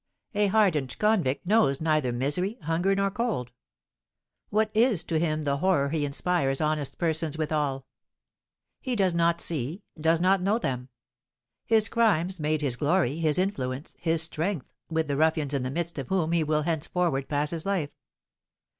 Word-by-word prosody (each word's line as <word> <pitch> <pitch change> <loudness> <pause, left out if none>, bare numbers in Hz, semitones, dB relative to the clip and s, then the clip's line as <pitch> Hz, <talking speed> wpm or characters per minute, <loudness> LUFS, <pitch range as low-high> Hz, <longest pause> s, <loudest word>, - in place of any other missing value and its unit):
A 205 0 +2
hardened 185 - +1
convict 190 -12 +1
knows 195 -9 +3
neither 155 -5 +1
misery, 145 - -1
hunger, 170 +5 +1
nor 195 0 +1
cold. 205 - -2 1.0
What 215 +1 +1
is 220 -6 +3
to 160 -1 -1
him 155 -2 0
the 140 -1 0
horror 150 -4 +2
he 150 -1 -1
inspires 140 -1 0
honest 150 -2 -1
persons 160 -2 0
withal? 150 -4 -1 0.9
He 255 -2 -3
does 190 -5 +2
not 170 0 +2
see, 160 - -2 0.2
does 160 +1 +2
not 185 +2 +3
know 200 +4 +2
them. 130 - -3 0.8
His 220 -2 +4
crimes 190 -6 +1
made 155 0 0
his 130 -4 +1
glory, 150 -1 +1
his 155 -2 +2
influence, 140 -8 -2
his 165 -1 +2
strength, 160 -1 -2 0.2
with 160 -1 0
the 140 -1 -1
ruffians 155 -2 +1
in 140 - 0
the 130 - -2
midst 170 +2 -3
of 135 - -5
whom 175 -4 0
he 170 -1 +2
will 155 0 0
henceforward 165 -3 -1
pass 145 0 +1
his 165 +1 -3
life. 175 -8 -1
160 Hz, 165 wpm, -27 LUFS, 145-190 Hz, 1.0 s, His